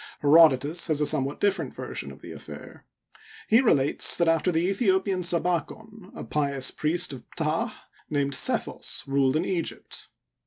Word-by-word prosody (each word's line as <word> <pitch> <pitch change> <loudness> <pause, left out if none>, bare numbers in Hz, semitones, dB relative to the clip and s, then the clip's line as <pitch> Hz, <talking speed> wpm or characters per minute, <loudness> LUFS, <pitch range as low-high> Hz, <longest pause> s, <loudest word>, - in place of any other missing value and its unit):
Herodotus 150 +1 +4
has 155 -3 0
a 150 - +1
somewhat 140 -1 -1
different 200 -1 -1
version - - -6
of - - -15
the - - -9
affair. - - -12 0.6
He 225 +3 +4
relates 145 - +4
that 170 - +1
after 165 +2 +2
the 165 +1 0
Aethiopian 190 -2 0
Sabikon, 180 +4 -2
a - - -7
pious 140 -3 -1
priest 165 0 0
of 125 - -10
Ptah 165 +8 -1 0.4
named 140 -2 -1
Sethos - - -2
ruled 135 0 +1
in 160 +3 0
Egypt. 175 -4 -4
165 Hz, 150 wpm, -25 LUFS, 145-185 Hz, 0.6 s, Herodotus